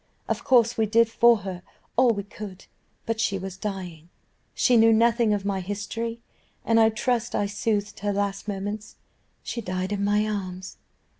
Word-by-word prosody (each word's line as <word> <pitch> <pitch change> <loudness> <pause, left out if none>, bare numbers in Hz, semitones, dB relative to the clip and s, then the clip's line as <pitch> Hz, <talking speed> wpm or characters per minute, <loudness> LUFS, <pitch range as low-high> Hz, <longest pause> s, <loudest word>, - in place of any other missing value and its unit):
"Of - - -2
course 235 -3 +3
we 220 - +3
did 230 +2 +4
for 235 +1 +5
her 185 -2 -6 0.3
all 255 +1 +5
we 205 -3 0
could, 200 -1 -10 0.4
but 225 -1 -2
she 215 -3 +1
was 190 0 -6
dying: 185 -5 -6 0.5
she 250 - +3
knew 225 0 +6
nothing 230 0 +3
of 205 -1 -1
my 200 -1 0
history, 210 +4 -4 0.5
and 225 0 +4
I 220 0 +6
trust 235 +1 -1
I 205 - +1
soothed 205 0 -2
her 205 0 -1
last 200 0 -2
moments 205 +1 -5 0.5
she 235 - -4
died 185 -1 -3
in 200 -1 -1
my 210 +1 +2
arms. 185 -3 -5
205 Hz, 170 wpm, -25 LUFS, 195-225 Hz, 0.5 s, knew